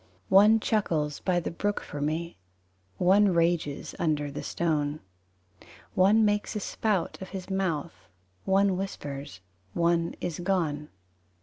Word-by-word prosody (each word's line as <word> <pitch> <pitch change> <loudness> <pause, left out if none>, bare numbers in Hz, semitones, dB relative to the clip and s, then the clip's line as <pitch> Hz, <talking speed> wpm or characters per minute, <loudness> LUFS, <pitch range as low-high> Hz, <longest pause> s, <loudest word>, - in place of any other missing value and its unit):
III - - -32 0.2
One 210 +3 +7
chuckles 160 -10 0
by 180 -2 +1
the 175 - -4
brook 205 +4 -1
for 145 - -7
me: 160 - -2 0.6
One 190 +1 +4
rages 165 -4 0
under 150 -3 0
the 140 - -5
stone. 150 -3 -1 0.9
One 210 +4 +5
makes 205 +1 0
a - - 0
spout 205 -3 -1
of 190 - -7
his 190 0 -7
mouth, 170 -5 -2 0.4
One 195 -1 +3
whispers 140 - -6 0.3
one 170 0 +1
is 175 -2 -4
gone. 165 -5 -1
175 Hz, 130 wpm, -28 LUFS, 150-195 Hz, 0.9 s, One